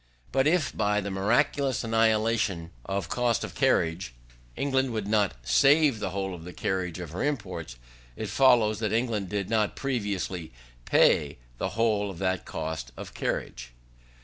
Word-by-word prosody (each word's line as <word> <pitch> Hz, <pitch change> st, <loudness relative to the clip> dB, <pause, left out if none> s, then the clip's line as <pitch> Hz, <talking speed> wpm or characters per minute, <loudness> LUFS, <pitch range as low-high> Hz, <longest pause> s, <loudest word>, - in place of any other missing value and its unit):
But 135 Hz, +2 st, +2 dB
if 160 Hz, -3 st, +1 dB
by 105 Hz, -1 st, +1 dB
the 100 Hz, -1 st, -4 dB
miraculous 125 Hz, +7 st, +1 dB
annihilation 110 Hz, -6 st, +1 dB
of 95 Hz, -3 st, -2 dB
cost 120 Hz, +4 st, 0 dB
of -, -, -6 dB
carriage, 80 Hz, -7 st, +1 dB, 0.4 s
England 135 Hz, -3 st, 0 dB
would 110 Hz, -3 st, -3 dB
not 105 Hz, -2 st, +2 dB
save 135 Hz, -, +4 dB
the -, -, -2 dB
whole 95 Hz, 0 st, -3 dB
of 85 Hz, -2 st, -9 dB
the 90 Hz, +1 st, -9 dB
carriage 90 Hz, -3 st, -2 dB
of 90 Hz, -4 st, -7 dB
her 90 Hz, -, -4 dB
imports, 90 Hz, -, -3 dB, 0.4 s
it -, -, -4 dB
follows 120 Hz, -6 st, +4 dB
that 110 Hz, -3 st, -1 dB
England 110 Hz, -5 st, 0 dB
did 100 Hz, -2 st, -2 dB
not 110 Hz, -2 st, +1 dB
previously 100 Hz, -, -3 dB, 0.3 s
pay 70 Hz, -1 st, +3 dB, 0.2 s
the -, -, -1 dB
whole 105 Hz, -3 st, +2 dB
of 95 Hz, -, -8 dB
that 95 Hz, 0 st, -1 dB
cost 80 Hz, -6 st, -5 dB
of -, -, -8 dB
carriage. -, -, -4 dB
105 Hz, 155 wpm, -27 LUFS, 90-115 Hz, 0.4 s, save